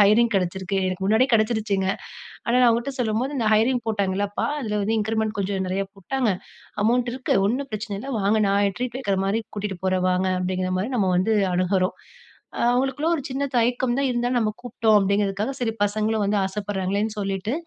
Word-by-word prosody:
Hiring 220 +3 +5
கிடைச்சருக்கு,' 190 +1 -1
எனக்கு 185 +1 -3
முன்னாடியே 225 +6 +4
கிடைச்சருச்சுங்க. 215 -3 +1 0.6
ஆனா 235 +2 +2
நா - - +7
அவங்ககிட்ட 235 +4 0
சொல்லும்போது, 235 +4 0
'இந்த 230 - 0
ஹயரிங் 240 +3 +2
போட்டாங்கல்லப்பா, 200 -1 -1
அதில 210 -4 -2
வந்து 220 +3 0
இன்கிரிமெண்ட் 220 0 -1
கொஞ்சம் 195 -1 -1
நிறைய 195 +2 -1
போட்டாங்க. 225 +4 -1 0.5
அமௌண்ட் 240 +1 +2
இருக்கு. 260 -1 -1
ஒன்னும் 265 +6 -1
பிரச்சனை 215 0 -4
இல்ல. 275 +4 -6
வாங்க, 205 +3 +2
நா 200 - +2 0.2
ட்ரீட் 250 -1 -3
வைக்கிற 200 -7 0
மாதிரி 205 +3 +1 0.2
கூட்டிட்டு 200 -3 -3
போறேன். 185 -1 +1
வாங் 185 +1 +1
அப்படிங்கிற 185 0 -1
மாதிரி 210 +7 -2
நம்ம 195 -5 +2
வந்து 215 +5 +2 0.2
அணுகுறோம். 185 +1 +1 0.7
அவங்களுக்குள்ள 270 +5 0
ஒரு 280 - -4
சின்ன 270 +2 -1
தயக்கம் 240 +1 +1
தான், 275 - +2
இருந்தாலும் 245 +1 0
நம்ம 215 -2 +1
கூப்பிட்டோம் 230 -3 +2
அப்படிங்கிறதுக்காக 200 +4 0
சரி, 225 -2 0
பசங்களும் 215 +1 0
வந்து 205 +1 +1
ஆசைப்படுறாங்களேன்னு 200 +1 -2
சொல்லிட்டு 195 +2 -2
215 Hz, 170 wpm, -24 LUFS, 195-240 Hz, 0.7 s, நா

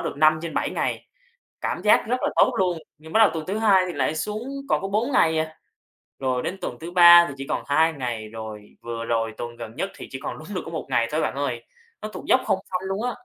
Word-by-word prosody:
được - - -12
5 155 +1 +5
trên 165 - -5
7 - - 0
ngày, - - -2 0.5
cảm - - -3
giác 210 - +4
rất 250 - +1
là - - +1
tốt - - +4
luôn. 180 -3 +1 0.2
Nhưng 160 +1 -13
bắt 220 - +4
đầu 220 - +7
tuần 155 -1 -4
thứ 200 +3 -2
hai 200 -4 +4
thì 180 - -4
lại 145 +2 -1
xuống 210 +7 -3 0.3
còn - - +1
có 195 - -3
4 225 +7 0
ngày 160 -7 +3
à. 155 0 -2 0.7
Rồi 130 -2 -1
đến 185 - -3
tuần - - -4
thứ 170 - -6
ba 175 -1 +9
thì - - -6
chỉ 135 - -7
còn - - -2
2 160 +3 +3
ngày, 120 -6 -4
rồi 110 -1 -9
vừa 115 -1 -5
rồi 115 -1 -1
tuần 120 0 -6
gần 115 -1 -8
nhất 195 +7 -3
thì - - -9
chỉ 130 - -6
còn - - -4
đúng 155 - -11
được 180 - -1
có 165 - -7
1 160 - -4
ngày 120 -3 +2
thôi, 155 +1 0
bạn - - -1
ơi. 125 -4 -3 0.4
Nó 215 - -4
tụt - - -9
dốc 260 - +4
không 190 - +1
phanh 185 +1 -2
luôn 195 +3 -2
á. 250 - 0
160 Hz, 265 wpm, -24 LUFS, 125-190 Hz, 0.7 s, ba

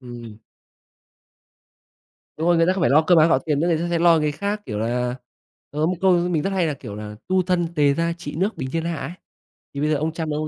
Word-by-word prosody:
Ừm. 120 -4 -10 2.0
Đúng 160 +2 -1
rồi, 175 - +4
người 165 - +3
ta 185 - +3
không 190 - -3
phải 165 - +2
lo 150 +3 +5
cơm 170 +1 +4
áo 160 +1 +6
gạo 130 - +4
tiền 145 +1 -1
nữa, 165 - +1
người 170 - +2
ta 170 - -2
sẽ 170 - +1
lo 170 -1 +5
cái 150 -1 0
khác, 200 +6 -3
kiểu 105 -2 -4
là, 125 +2 -1 0.6
có 150 +2 0
một 180 - 0
câu 190 0 +4 0.2
mình 160 -4 0
rất 195 - -1
hay 190 -3 +1
là, 150 - -1
kiểu 120 -6 -9
là 105 0 -8
"Tu 185 0 +2
thân, 180 -1 0
tề 145 -3 +3
gia, 165 +2 0
trị 165 -4 -8
nước, 195 +6 -1
bình 130 0 -5
thiên 165 0 -1
hạ" 170 -1 -2
ấy. 165 - -5 0.6
Thì 140 - -5
bây 150 - +1
giờ 155 - +2
ông 155 +3 -1
Trump 160 -2 -4
ông 155 +1 -2
160 Hz, 265 wpm, -22 LUFS, 140-175 Hz, 2.0 s, áo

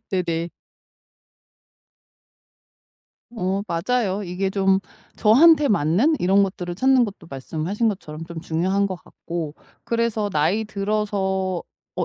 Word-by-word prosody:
네네. 170 -2 -1 2.9
어 190 0 -1
맞아요. 200 +3 0
이게 185 +2 -2
좀 195 -1 +2 0.4
저한테 290 +7 +6
맞는 205 - +2
이런 195 +3 +4
것들을 180 -2 -3
찾는 260 +4 +4
것도 200 -5 -8
말씀하신 160 - -2
것처럼 165 -5 -5
좀 170 -1 -8
중요한 185 +5 0
것 190 -2 -4
같고 165 -3 -6 0.3
그래서 230 -3 0
나이 185 +7 +1
들어서 195 -3 -1 0.3
어 - - -1
190 Hz, 230 characters per minute, -22 LUFS, 175-210 Hz, 2.9 s, 저한테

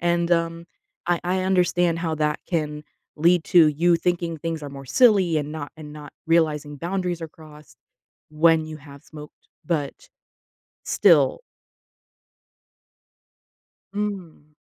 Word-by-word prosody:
and, 170 0 0
um, 165 0 0 0.4
I 175 -1 +1
I 185 +1 0
understand 180 -2 +1
how 165 -2 -2
that 150 0 0
can 150 -3 -3 0.3
lead 170 +2 +3
to 170 -4 +6
you 170 +3 +2
thinking 170 -1 -1
things 165 0 -4
are 145 - -6
more 135 -1 -10
silly, 190 - +4
and 150 0 -5
not 145 -2 -7
and 150 -1 -10
not 150 -1 -11
realizing 150 -3 +1
boundaries 175 +1 -3
are 160 - -5
crossed 150 -6 -16 0.5
when 160 +1 +3
you 155 0 -8
have 140 -1 -14
smoked, 150 -1 -14 0.2
but 150 -5 -3 0.7
still. - - +3 2.5
Mm. 185 -7 -5
165 Hz, 125 wpm, -23 LUFS, 150-175 Hz, 2.5 s, to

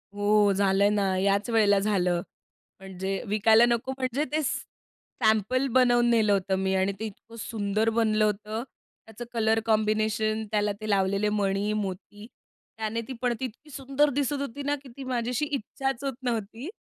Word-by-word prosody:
हो, 205 0 +3
झालंय 195 +1 +3
ना, 200 -2 +1
याच 200 +4 +1
वेळेला 210 -3 +4
झालं. 180 -4 +1 0.6
म्हणजे 190 0 -4
विकायला 220 +3 +5
नको 240 +2 0
म्हणजे 260 +2 -1
ते 310 +1 +1
सॅ - - -1 0.6
सॅम्पल 220 +5 +2
बनवून 240 -1 +4
नेलं 220 -3 +3
होतं 190 -1 0
मी 190 0 0
आणि 190 +1 +1
ते 220 - -3
इतकं 220 +2 -10
सुंदर 215 0 -1
बनलं 215 -2 +3
होतं. 215 +2 -2 0.4
त्याचं 225 +2 -9
कलर 225 -1 +2
कॉम्बिनेशन, 215 0 +1
त्याला 210 -1 +1
ते 215 - -5
लावलेले 200 +1 +1
मणी, 205 0 0
मोती 205 0 -5 0.5
त्याने 220 +1 -2
ती 265 - -5
पणती 245 0 -1
इतकी 255 +6 -10
सुंदर 275 +1 +1
दिसत 285 +1 -1
होती 280 0 -5
ना 290 +1 +1
की 270 - -12
ती 275 - -6
माझी 245 -2 -2
अशी 250 +4 0
इच्छाच 270 0 -3
होत 275 -1 -2
नव्हती. 230 - -3
215 Hz, 165 wpm, -27 LUFS, 200-240 Hz, 0.6 s, विकायला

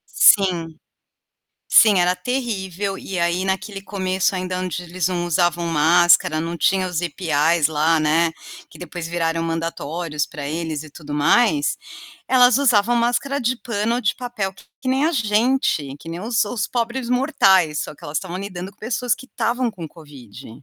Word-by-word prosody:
Sim, 170 -5 +4 0.9
sim 210 -5 +6
era 180 +1 +2
terrível 195 -4 -3
e 190 -2 -5
aí 170 +2 0
naquele 195 +1 -3
começo 190 -1 -1
ainda 185 0 -3
onde 180 -1 -4
eles 175 0 -2
não 175 -1 -2
usavam 175 0 +1
máscara, 165 0 +4
não 170 +1 -4
tinha 190 +2 +2
os 180 -2 -2
IPAs 165 -2 +1
lá, 160 +1 +2
né, 160 +2 +2 0.4
que - - -15
depois 175 -2 -7
viraram 165 -1 -1
mandatórios 165 -1 -3
para 145 -1 -7
eles 160 -1 -3
e 155 - -13
tudo 150 -1 -10
mais, 150 0 +2 0.5
elas 255 0 +5
usavam 240 -4 +3
máscara 245 +4 0
de 245 +1 0
pano 230 -1 -2
ou - - -2
de 205 - 0
papel 240 -6 -4 0.3
que 260 - -4
nem 265 +3 +1
a 335 - 0
gente, 215 - 0
que 165 - -12
nem 170 +2 -5
os 220 -1 0
os 220 +1 -3
pobres 240 0 -2
mortais, 190 - +3
só 150 - -6
que - - -17
elas 145 +1 -2
estavam 185 -2 -6
lidando 190 -1 -6
com - - -28
pessoas 240 +1 -1
que 260 - -13
estavam 245 -1 -1
com 170 -7 -8
covid. 135 - -13
180 Hz, 170 wpm, -21 LUFS, 165-225 Hz, 0.9 s, sim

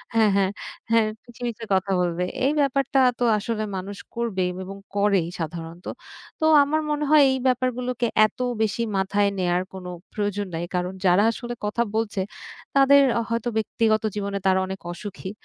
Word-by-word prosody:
হ্যাঁ, 220 -2 +5
হ্যাঁ, 195 0 +2 0.4
হ্যাঁ, 225 -1 +4 0.2
পিছে, 240 0 -16
পিছে 230 -1 -5
কথা 190 +1 +1
বলবে। 175 0 0 0.2
এই 280 - +3
ব্যাপারটা 275 0 +2 0.2
তো - - +1
আসলে 215 +1 -2
মানুষ 195 +1 -6 0.2
করবে 225 -6 -1
বে - - -5
এবং 195 +1 -8 0.2
করেই 200 -4 +2
সাধারণত। 165 +2 -6 0.5
তো 315 - +1 0.2
আমার 310 +2 0
মনে 295 0 0
হয় 300 -2 +8
এই 265 - 0
ব্যাপারগুলোকে 250 -1 0 0.2
এত 215 - -6 0.2
বেশি 220 +1 0 0.2
মাথায় 200 +1 +2
নেয়ার 180 0 +1
কোনো 185 -1 -7 0.2
প্রয়োজন 205 -1 -2
নাই। 165 - -3
কারণ 180 +1 -1
যারা 180 +3 +5
আসলে 240 +1 -6
কথা 235 +3 0
বলছে 220 -3 -1 0.6
তাদের 275 +1 +7 0.2
আ - - +1
হয়তো 230 +1 -1
ব্যক্তিগত 220 0 +1
জীবনে 200 -1 -2
তারা 190 0 +4
অনেক 190 0 -5
অসুখী। 195 +1 -7
210 Hz, 165 wpm, -24 LUFS, 190-240 Hz, 0.6 s, হয়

